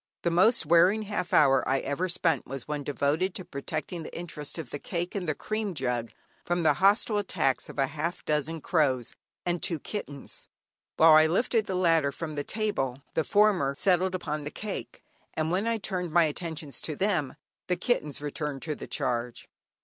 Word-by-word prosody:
The 170 Hz, -, +2 dB
most 185 Hz, +4 st, +4 dB
wearing 175 Hz, +7 st, +5 dB
half 205 Hz, -3 st, -3 dB
hour 135 Hz, -1 st, +5 dB
I 135 Hz, -, +3 dB
ever 155 Hz, +7 st, -2 dB
spent 165 Hz, -5 st, +1 dB
was 135 Hz, 0 st, -6 dB
one 150 Hz, -1 st, -3 dB
devoted 145 Hz, +6 st, 0 dB
to 185 Hz, -, -5 dB
protecting 155 Hz, +4 st, -5 dB
the 155 Hz, -, -8 dB
interest 160 Hz, -4 st, -6 dB
of 155 Hz, -7 st, -6 dB
the 145 Hz, -, -4 dB
cake 175 Hz, +2 st, -3 dB
and 185 Hz, -5 st, -2 dB
the 155 Hz, -, 0 dB
cream 215 Hz, -3 st, -3 dB
jug, 125 Hz, -4 st, -1 dB, 0.3 s
from 175 Hz, 0 st, 0 dB
the 160 Hz, -, +5 dB
hostile 205 Hz, +2 st, +4 dB
attacks 135 Hz, -, 0 dB
of -, -, -10 dB
half 150 Hz, +5 st, -1 dB
a -, -, -38 dB
dozen 155 Hz, +1 st, -1 dB
crows 135 Hz, -9 st, +1 dB, 0.3 s
and 175 Hz, -1 st, -1 dB
two 170 Hz, -, 0 dB
kittens. 145 Hz, -6 st, -7 dB, 0.5 s
While 160 Hz, 0 st, +8 dB
I 155 Hz, 0 st, +7 dB
lifted 215 Hz, +5 st, +1 dB
down 185 Hz, -, -1 dB
the 185 Hz, -, 0 dB
latter 165 Hz, -4 st, +4 dB
from 155 Hz, +1 st, -5 dB
the 145 Hz, -1 st, -2 dB
table 140 Hz, -, -2 dB
the 160 Hz, -, +1 dB
former 190 Hz, -8 st, +3 dB
settled 185 Hz, +3 st, +2 dB
upon 150 Hz, -4 st, -3 dB
the 145 Hz, -, -4 dB
cake, 210 Hz, +5 st, -6 dB, 0.3 s
and 160 Hz, +1 st, 0 dB
when 195 Hz, +5 st, 0 dB
I 230 Hz, 0 st, +1 dB
turned 185 Hz, -5 st, -3 dB
my 170 Hz, +1 st, +5 dB
attentions 155 Hz, -1 st, -4 dB
to 155 Hz, -, -4 dB
them, 180 Hz, -6 st, 0 dB, 0.3 s
the 180 Hz, -, +2 dB
kittens 150 Hz, -, -1 dB
returned 145 Hz, -1 st, -3 dB
to 155 Hz, -, -2 dB
the -, -, -8 dB
charge. 120 Hz, 0 st, -2 dB
165 Hz, 190 wpm, -28 LUFS, 145-185 Hz, 0.5 s, While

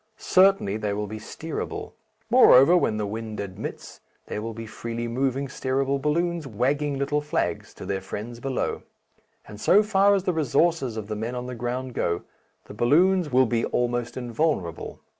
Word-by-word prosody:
Certainly 190 Hz, -, +3 dB
they 105 Hz, -2 st, -2 dB
will 105 Hz, +1 st, -2 dB
be 110 Hz, +1 st, -7 dB
steerable. 160 Hz, +7 st, -6 dB, 0.4 s
Moreover, 175 Hz, -, +7 dB
when 110 Hz, -11 st, +2 dB
the 105 Hz, -, -1 dB
wind 110 Hz, +1 st, -5 dB
admits, 100 Hz, -2 st, -7 dB, 0.2 s
there 105 Hz, -, -4 dB
will 115 Hz, 0 st, -5 dB
be 115 Hz, 0 st, -6 dB
freely 115 Hz, +1 st, -5 dB
moving 135 Hz, +3 st, -1 dB
steerable 135 Hz, +1 st, -1 dB
balloons 170 Hz, +1 st, 0 dB
wagging 140 Hz, +5 st, 0 dB
little 145 Hz, +2 st, 0 dB
flags 145 Hz, -9 st, -2 dB
to -, -, -9 dB
their 95 Hz, -1 st, -2 dB
friends 110 Hz, +5 st, -7 dB
below. 135 Hz, +1 st, -2 dB, 0.7 s
And 105 Hz, 0 st, -10 dB
so 205 Hz, +3 st, +5 dB
far 200 Hz, -1 st, +4 dB
as 195 Hz, -, -1 dB
the 185 Hz, -2 st, 0 dB
resources 150 Hz, -4 st, +1 dB
of 110 Hz, -, -4 dB
the 105 Hz, +1 st, -4 dB
men 115 Hz, +4 st, -4 dB
on 125 Hz, 0 st, -4 dB
the 125 Hz, -, -5 dB
ground 125 Hz, +2 st, -4 dB
go, 85 Hz, -5 st, -1 dB, 0.4 s
the -, -, -11 dB
balloons 165 Hz, -, +3 dB
will 130 Hz, +1 st, +5 dB
be 115 Hz, -1 st, 0 dB
almost 120 Hz, 0 st, -1 dB
invulnerable. 120 Hz, -, -2 dB
125 Hz, 170 wpm, -25 LUFS, 110-150 Hz, 0.7 s, Moreover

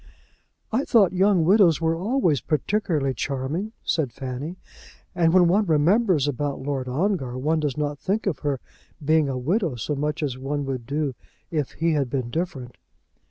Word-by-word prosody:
"I 245 Hz, +5 st, +1 dB
thought 205 Hz, -10 st, +4 dB
young 185 Hz, -2 st, +3 dB
widows 180 Hz, -4 st, +5 dB
were 165 Hz, 0 st, +1 dB
always 180 Hz, -, +1 dB
particularly 155 Hz, -4 st, 0 dB
charming," 140 Hz, -, -3 dB
said 145 Hz, -7 st, 0 dB
Fanny; 135 Hz, +7 st, -6 dB, 0.6 s
"and 170 Hz, -2 st, +3 dB
when 180 Hz, 0 st, +5 dB
one 200 Hz, +4 st, +2 dB
remembers 165 Hz, -, +3 dB
about 145 Hz, 0 st, -2 dB
Lord 135 Hz, -1 st, -3 dB
Ongar 135 Hz, -3 st, -1 dB
one 155 Hz, +5 st, +1 dB
does 150 Hz, -2 st, -2 dB
not 145 Hz, -1 st, -2 dB
think 210 Hz, +4 st, -1 dB
of 195 Hz, -6 st, -1 dB
her 145 Hz, -3 st, -1 dB, 0.5 s
being 155 Hz, -1 st, +3 dB
a 130 Hz, -, -2 dB
widow 165 Hz, -, 0 dB
so 120 Hz, +6 st, -3 dB
much 150 Hz, +2 st, -2 dB
as 130 Hz, -3 st, -2 dB
one 140 Hz, +2 st, -2 dB
would 130 Hz, -3 st, -4 dB
do 145 Hz, -1 st, -1 dB, 0.4 s
if 150 Hz, -5 st, -2 dB
he 165 Hz, +1 st, 0 dB
had 140 Hz, -4 st, 0 dB
been 125 Hz, -2 st, -2 dB
different." 135 Hz, -7 st, -4 dB
150 Hz, 165 wpm, -24 LUFS, 135-180 Hz, 0.6 s, widows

